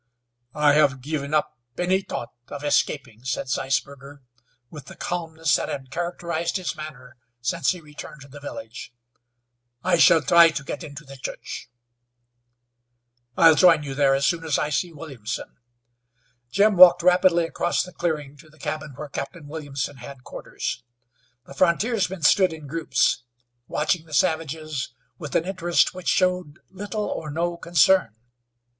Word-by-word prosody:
"I 150 -1 +4
have 140 -3 +3
given 145 0 -4
up 155 -4 0 0.2
any 185 +2 +1
thought 120 - -6
of 145 0 -8
escaping," 140 -5 0
said 130 0 -3
Zeisberger, 140 +1 -3 0.5
with 150 -4 -10
the - - -11
calmness 165 -3 -1
that - - -4
had 130 -1 -6
characterized 170 +1 -2
his 185 -2 -4
manner 135 -4 -10 0.2
since 135 +5 0
he 180 -2 -1
returned 150 -1 -11
to 135 - -12
the 145 +1 -12
village. 145 - -9 0.9
"I 180 -1 +3
shall 160 -2 +6
try 170 0 +7
to 155 -1 -4
get 155 - -6
into 150 -1 -9
the 135 0 -11
church." 130 - -7 1.7
"I'll 165 -1 +8
join 165 -2 +5
you 140 -2 -5
there 135 0 +3
as 135 0 +1
soon 165 +1 +1
as 160 -4 0
I 150 - -1
see 170 +5 -1
Williamson." 135 -7 -7 0.9
Jim 200 - +3
walked 175 -1 +9
rapidly 180 -1 +4
across 175 +1 0
the 180 - -11
clearing 150 -5 -3
to 155 +2 -17
the 155 - -21
cabin 150 0 -5
where 150 +2 -7
Captain 145 +2 -6
Williamson 145 -3 -5
had 130 +1 -11
quarters. 125 0 -6 0.6
The - - -12
frontiersmen 185 - +1
stood 185 +3 +5
in 155 -2 -10
groups, 155 -2 +1 0.5
watching 160 +2 -1
the 155 - -5
savages 155 -4 -1 0.2
with 150 -5 -7
an 165 - +2
interest 175 -2 +1
which 185 -1 -9
showed 180 -4 +1
little 205 +2 -4
or 155 - -4
no 170 +3 -1
concern. 170 - +3
155 Hz, 150 wpm, -24 LUFS, 140-175 Hz, 1.7 s, walked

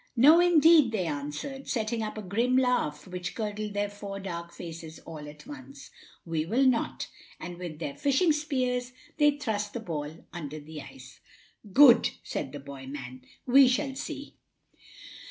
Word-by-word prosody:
"No, 295 +8 +7
indeed," 330 -6 +6
they 200 -5 -1
answered, 150 - -5
setting 225 -1 -1
up 215 0 -4
a 215 - -5
grim 235 +7 +1
laugh 250 - +1
which 180 -1 -5
curdled 210 -1 -4
their 205 0 +1
four 200 -1 -7
dark 170 -3 -6
faces 165 -2 -8
all 150 -2 -8
at 150 0 -13
once, 285 -1 -11 0.3
"we 165 -2 -1
will 235 +11 +2
not"; 250 -3 +1 0.3
and 175 -1 -7
with 170 -4 -6
their 145 -3 -4
fishing 285 - +2
spears 255 -5 -1 0.3
they 295 -1 +4
thrust 210 -7 -2
the 240 - -3
ball 160 -6 -6
under 155 -3 -6
the 150 0 -9
ice. 270 - -13 0.5
"Good!" 250 0 +7
said - - -4
the 145 - -7
boy 135 -1 -9
man, 130 -2 -7 0.2
"we 265 +1 +7
shall 265 +2 0
see." - - -6
210 Hz, 160 wpm, -28 LUFS, 160-260 Hz, 0.5 s, No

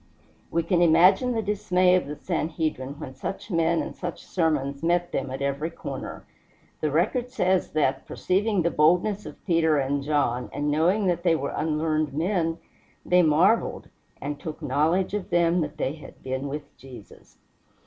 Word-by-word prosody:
We 170 - 0
can 175 0 +1
imagine 180 +9 +5
the 225 -1 -1
dismay 185 -3 +2
of 180 -5 +2
the 150 - -5
Sanhedrim 155 -5 -3
when 130 -4 -7
such 195 +10 -6
men 165 0 +2
and - - -7
such 175 -2 -6
sermons 145 -5 -1
met 175 +1 +1
them 135 - -2
at 130 +1 -4
every 140 +3 -1
corner. 165 - -7 0.5
The 155 - 0
record 210 - 0
says 190 -7 0
that, 135 -3 0
perceiving 195 0 0
the 170 - +1
boldness 180 +7 +2
of - - -12
Peter 165 -4 +3
and 140 +1 0
John, 140 -4 0
and 145 0 -1
knowing 175 +8 +2
that 175 -2 +1
they 170 -2 +3
were 140 -2 -3
unlearned 155 -1 0
men, 165 +1 0 0.5
they 180 0 +5
marveled, 175 +8 +2 0.3
and 145 0 -5
took 155 0 -7
knowledge 155 +8 +1
of 205 -3 -3
them 170 0 +3
that 150 -1 -4
they 135 - -1
had 155 - -13
been 130 +1 -3
with 145 +1 -7
Jesus! 125 -4 -14
160 Hz, 170 wpm, -25 LUFS, 145-180 Hz, 0.5 s, imagine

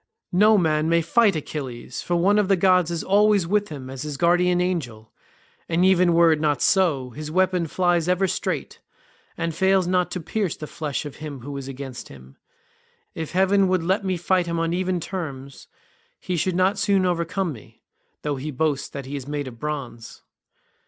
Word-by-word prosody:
No 210 +4 +5
man 155 -3 +1
may 170 0 +3
fight 215 +1 +3
Achilles, 140 -5 -6
for 175 - -1
one 195 +5 +3
of 205 - +1
the 195 - +4
gods 180 -2 +3
is 170 -1 -3
always 205 -1 +3
with 205 +3 0
him 140 -4 -8
as 130 0 -7
his 150 -2 -5
guardian 175 +2 +3
angel, 130 -12 -3 0.6
and 170 +2 +2
even 180 -2 +4
were 170 -1 +6
it 155 - +1
not 150 -3 +1
so, 145 -7 +2
his 150 +4 -7
weapon 185 0 +1
flies 175 0 +1
ever 180 +1 +2
straight, - - -3 0.6
and 165 -1 -2
fails 190 +1 +2
not 180 0 +1
to 180 - -4
pierce 190 +2 -2
the 155 - -7
flesh 150 -1 -4
of 145 - -8
him 150 -4 -7
who 140 +3 -7
is 135 -1 -6
against 135 -2 -7
him; 65 0 -15 0.8
if 160 0 -6
heaven 190 +1 +3
would 185 -2 +1
let 190 +4 0
me 185 -2 -1
fight 180 +1 +1
him 170 0 -2
on 165 0 0
even 185 0 -1
terms 140 -7 -7 0.5
he 180 - -3
should 175 +2 0
not 185 +3 +2
soon 195 -2 +2
overcome 175 0 -1
me, 115 - -16 0.4
though 145 -2 -2
he 140 +4 -5
boasts 145 0 -1
that 140 - -7
he 140 +2 -6
is 135 -1 -6
made 145 -1 -3
of 115 -3 -10
bronze." 135 -6 -6
170 Hz, 195 wpm, -23 LUFS, 145-185 Hz, 0.8 s, were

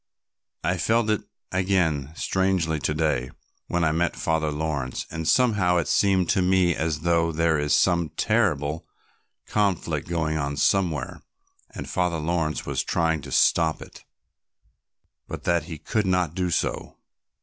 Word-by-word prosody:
I 90 +3 0
felt 110 +5 +1
it 105 - 0 0.3
again 85 -7 0
strangely 95 -5 0
to 75 - -1
day 75 -5 0 0.4
when 85 0 0
I 80 - +3
met 85 +2 0
Father 80 -1 0
Laurence, 75 -4 -3
and 80 0 -4
somehow 105 -8 +3
it 85 - 0
seemed 95 -3 +2
to 95 - +2
me 90 -1 +3
as 80 -1 -2
though 85 0 +2
there 80 0 +1
was 75 +1 +1
some 85 +2 +2
terrible 80 -8 0 0.6
conflict 100 -4 -1
going 80 -2 -1
on 70 0 -3
somewhere, 80 -4 0 0.5
and - - -6
Father 90 -2 0
Laurence 80 0 -1
was - - -1
trying 80 -2 0
to 70 -1 -10
stop 80 +2 +3
it, - - -13 1.2
but - - -7
that 85 -3 +1
he 80 -2 -7
could 105 +6 -1
not 90 -4 +1
do 90 0 -1
so." 85 - -2
85 Hz, 150 wpm, -25 LUFS, 80-90 Hz, 1.2 s, I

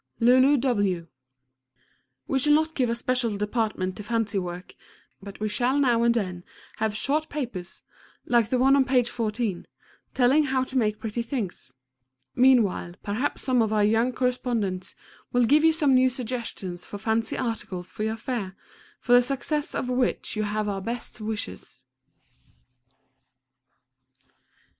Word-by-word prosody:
LULU 255 +4 +5
W. 205 -10 0 1.2
We 270 - +1
shall 295 +3 +4
not 315 +1 +2
give 255 -5 0
a 235 - 0
special 235 -3 -1
department 210 -3 -1
to 210 - -7
fancy 220 -2 -1
work, 180 0 -7 0.5
but 200 0 -10
we 215 - -1
shall 245 +5 +1
now 245 -5 +3
and 235 0 +3
then 180 -5 -2 0.3
have 215 -1 -1
short 305 +6 0
papers, 230 -12 -6 0.4
like 235 -3 +2
the 255 - +1
one 265 +2 +5
on 275 - +5
page 250 -2 +1
14, 220 -4 -2 0.5
telling 270 +4 +4
how 260 -1 +1
to 260 +1 -9
make 215 -4 +1
pretty 225 +1 -3
things. 225 - -5 0.6
Meanwhile 230 -9 +3
perhaps 220 +8 -2
some 255 -2 +2
of 220 -1 +1
our 210 -1 +2
young 225 +4 +3
correspondents 240 -7 -2 0.4
will 245 -1 +3
give 295 +6 +4
you 325 - +6
some 305 -4 +2
new 255 0 +5
suggestions 235 -8 -5
for 205 - -8
fancy 220 +2 -1
articles 200 -7 -4
for - - -8
your 220 +1 -1
fair, 215 -5 -4 0.4
for 245 - +1
the 245 - +8
success 275 +3 -2
of - - -2
which 250 -2 -1
you 215 - -1
have 210 0 -1
our 195 -1 -2
best 235 +2 -5
wishes. 210 - -6
235 Hz, 150 wpm, -26 LUFS, 210-255 Hz, 1.2 s, the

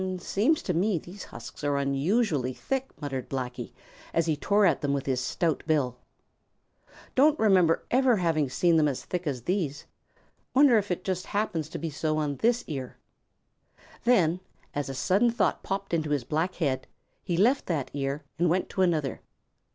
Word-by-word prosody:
"Seems 220 - +1
to 180 - -1
me 185 +3 +1
these 180 +5 -9
husks - - -10
are 145 -1 +1
unusually 140 - +1
thick," 270 - -3
muttered 135 -4 -4
Blacky, 125 -2 -4 0.4
as 165 - +3
he 160 -2 +1
tore 200 +7 +2
at 165 -7 +3
them 140 -1 0
with 140 -1 -2
his 130 -2 0
stout 165 +4 0
bill. 130 -6 +1 1.1
"Don't 295 +3 +4
remember 185 -6 +4
ever 255 -1 +4
having 160 -6 +1
seen 170 +5 +3
them 155 -1 +4
as 135 -3 -3
thick 180 -2 -3
as 130 -5 -2
these. 165 -4 -2 0.7
Wonder 260 -4 +6
if 205 - -5
it 180 0 -2
just 185 -1 -2
happens 170 -7 -1
to - - -5
be 165 -2 -4
so 155 +1 -1
on 145 -3 -1
this 240 - +2
ear." 135 -4 -6 1.1
Then, 180 -8 +3 0.3
as 145 -1 -3
a 135 - -4
sudden 200 - +3
thought 235 - 0
popped 195 -1 -4
into 155 -2 0
his 145 -4 0
black 160 +8 -1
head, 135 -6 -1 0.4
he 175 - -1
left 245 +9 +3
that 155 -7 -2
ear 140 +1 -2 0.2
and 175 0 +3
went 180 +3 0
to 190 - -2
another. 160 -7 +1
165 Hz, 175 wpm, -27 LUFS, 140-195 Hz, 1.1 s, Wonder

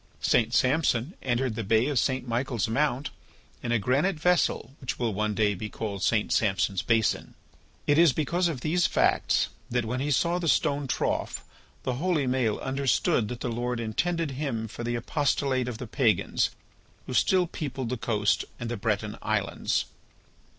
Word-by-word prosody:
St. 115 0 +3
Samson 130 +3 +2
entered 125 -1 0
the 115 +1 -3
Bay 110 +3 +3
of 140 -3 +1
St. 130 -1 0
Michael's 120 -2 -1
Mount 135 +3 0 0.5
in 120 - -3
a 120 - +4
granite 140 - +1
vessel 170 -7 +1
which 130 - -3
will 115 -3 -1
one 105 +1 -1
day 105 -1 +2
be 105 +3 -5
called 100 -2 -5
St. 110 +1 +1
Samson's 95 -2 +1
basin. 115 -2 +1 0.5
It 145 +2 +4
is 170 -3 +7
because 170 +6 0
of 150 -7 -3
these 170 +5 +2
facts - - +2 0.2
that 120 -1 0
when 125 +3 -2
he 140 +2 -1
saw 170 +5 +2
the 170 - -2
stone 145 -2 +2
trough - - -2 0.4
the 130 - -1
holy 170 -6 +1
Maël 125 -4 +1
understood 130 -4 +1
that 120 +2 -6
the 125 - -2
Lord 120 +1 -2
intended 160 +8 -1
him 130 -5 -3
for 120 - -7
the 120 0 -1
apostolate 130 0 0
of 120 -3 -4
the 125 - -6
pagans 115 -1 +1 0.6
who 130 - -6
still 185 +7 +3
peopled 135 -7 -4
the 125 - -1
coast 110 -3 +1 0.2
and 120 0 -4
the 120 - -2
Breton 105 0 -2
islands. - - 0
125 Hz, 170 wpm, -27 LUFS, 115-145 Hz, 0.6 s, is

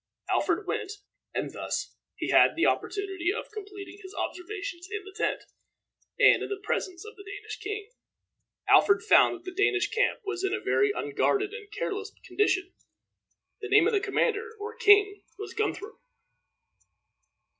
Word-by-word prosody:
Alfred 385 +2 +1
went, 390 +2 -3 0.4
and - - -3
thus - - -4 0.2
he - - -3
had - - +6
the - - +2
opportunity 390 -3 0
of 445 - -5
completing 405 -1 -9
his 380 0 -11
observations 365 -1 -5
in 420 -2 -4
the 395 - -11
tent, - - -1 0.8
and - - +6
in - - -4
the 405 - -2
presence 370 -2 -3
of 435 - -10
the 400 - -12
Danish 410 +2 -8
king. 420 -1 -5 0.8
Alfred 400 +2 +5
found 430 - +5
that 355 - -13
the 370 - -6
Danish 400 -1 +2
camp - - +1
was 390 -2 -3
in 390 +1 +1
a - - -3
very 415 - +2
unguarded 415 -1 0
and 430 -3 -9
careless 415 0 -4
condition. 375 -3 0 0.9
The 415 - -5
name 420 +1 +6
of 450 - +2
the 410 - +4
commander, 445 +3 -1
or 440 +2 -6
king, 410 -3 +5 0.2
was 410 -2 -7
Guthrum. 425 +1 -3
410 Hz, 155 wpm, -28 LUFS, 390-425 Hz, 0.9 s, had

